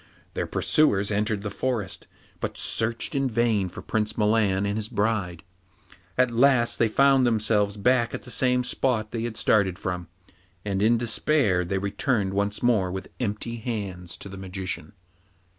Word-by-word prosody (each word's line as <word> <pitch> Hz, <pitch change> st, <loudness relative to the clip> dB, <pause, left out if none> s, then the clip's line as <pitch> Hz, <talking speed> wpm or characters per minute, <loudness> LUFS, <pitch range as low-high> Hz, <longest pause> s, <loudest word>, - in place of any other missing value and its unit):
Their -, -, -2 dB
pursuers 100 Hz, -10 st, +2 dB
entered 105 Hz, 0 st, -1 dB
the 105 Hz, -, -4 dB
forest, 110 Hz, -2 st, -3 dB, 0.3 s
but -, -, -4 dB
searched 115 Hz, +7 st, +1 dB
in 135 Hz, -2 st, +1 dB
vain 110 Hz, -5 st, +1 dB
for -, -, -10 dB
Prince 105 Hz, -1 st, -2 dB
Milan 105 Hz, -3 st, +2 dB
and 100 Hz, 0 st, -1 dB
his 110 Hz, 0 st, -4 dB
bride. 105 Hz, -6 st, -1 dB, 0.7 s
At 125 Hz, -1 st, +3 dB
last 120 Hz, -1 st, +3 dB
they 115 Hz, -, +4 dB
found 135 Hz, +3 st, +4 dB
themselves 105 Hz, -2 st, +1 dB
back 120 Hz, +2 st, +2 dB
at -, -, -7 dB
the 125 Hz, -, -9 dB
same 125 Hz, +3 st, +2 dB
spot 120 Hz, -3 st, -1 dB
they 115 Hz, -, -3 dB
had 115 Hz, -1 st, -4 dB
started 95 Hz, -4 st, +2 dB
from, 90 Hz, -2 st, -4 dB, 0.6 s
and 100 Hz, -1 st, -1 dB
in 115 Hz, +3 st, +4 dB
despair 115 Hz, -4 st, +1 dB
they 95 Hz, +3 st, -2 dB
returned 100 Hz, +1 st, -1 dB
once 100 Hz, +2 st, -1 dB
more 105 Hz, -7 st, +2 dB
with 95 Hz, +1 st, -6 dB
empty 115 Hz, 0 st, -3 dB
hands 100 Hz, -7 st, -5 dB
to -, -, -9 dB
the 95 Hz, 0 st, -9 dB
Magician. 95 Hz, +1 st, -5 dB
110 Hz, 160 wpm, -25 LUFS, 100-120 Hz, 0.7 s, they